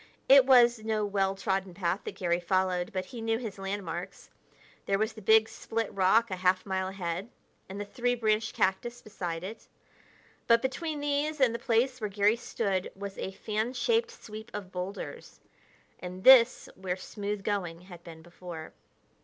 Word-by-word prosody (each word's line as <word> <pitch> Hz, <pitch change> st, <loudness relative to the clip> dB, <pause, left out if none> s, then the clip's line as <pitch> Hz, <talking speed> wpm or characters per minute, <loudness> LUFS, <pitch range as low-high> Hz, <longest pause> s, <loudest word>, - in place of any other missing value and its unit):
It 270 Hz, -1 st, +8 dB
was 240 Hz, -3 st, +6 dB
no 215 Hz, -1 st, -1 dB
well 195 Hz, -1 st, 0 dB
trodden 195 Hz, -2 st, -2 dB
path 180 Hz, +1 st, -1 dB
that -, -, -5 dB
Garry 175 Hz, -1 st, 0 dB
followed, 180 Hz, 0 st, 0 dB
but 185 Hz, -1 st, -3 dB
he 230 Hz, +4 st, -8 dB
knew 225 Hz, 0 st, 0 dB
his 220 Hz, -5 st, -6 dB
landmarks. 195 Hz, -2 st, -5 dB, 0.6 s
There 195 Hz, -, +2 dB
was 220 Hz, +2 st, -1 dB
the 220 Hz, -, -11 dB
big 220 Hz, +2 st, +5 dB
split 225 Hz, -1 st, -4 dB
rock 200 Hz, +4 st, +3 dB
a 185 Hz, -, -2 dB
half 185 Hz, 0 st, +2 dB
mile 190 Hz, -1 st, -1 dB
ahead, 190 Hz, +1 st, -4 dB, 0.4 s
and 195 Hz, +1 st, -6 dB
the 205 Hz, -, -3 dB
three 245 Hz, +4 st, -1 dB
branched 220 Hz, -1 st, 0 dB
cactus 215 Hz, +6 st, 0 dB
beside 175 Hz, -5 st, -5 dB
it. 210 Hz, +4 st, -8 dB, 0.8 s
But 230 Hz, +1 st, +5 dB
between 300 Hz, +3 st, -2 dB
these 290 Hz, +1 st, -1 dB
and 255 Hz, -4 st, +4 dB
the 235 Hz, -, -3 dB
place 245 Hz, +2 st, +1 dB
where 210 Hz, -, -2 dB
Garry 205 Hz, +2 st, +3 dB
stood 200 Hz, -5 st, -2 dB
was 200 Hz, 0 st, -7 dB
a -, -, -3 dB
fan 215 Hz, +4 st, -2 dB
shaped 460 Hz, -, +1 dB
sweep 220 Hz, -, -10 dB
of 195 Hz, -3 st, -6 dB
boulders 185 Hz, +2 st, -6 dB, 0.6 s
and 180 Hz, +1 st, -8 dB
this 255 Hz, -2 st, +7 dB
where 185 Hz, -1 st, -3 dB
smooth 205 Hz, +1 st, -5 dB
going 180 Hz, -5 st, -2 dB
had 175 Hz, -2 st, -13 dB
been 160 Hz, -1 st, -11 dB
before. 175 Hz, -2 st, -9 dB
200 Hz, 170 wpm, -29 LUFS, 185-230 Hz, 0.8 s, It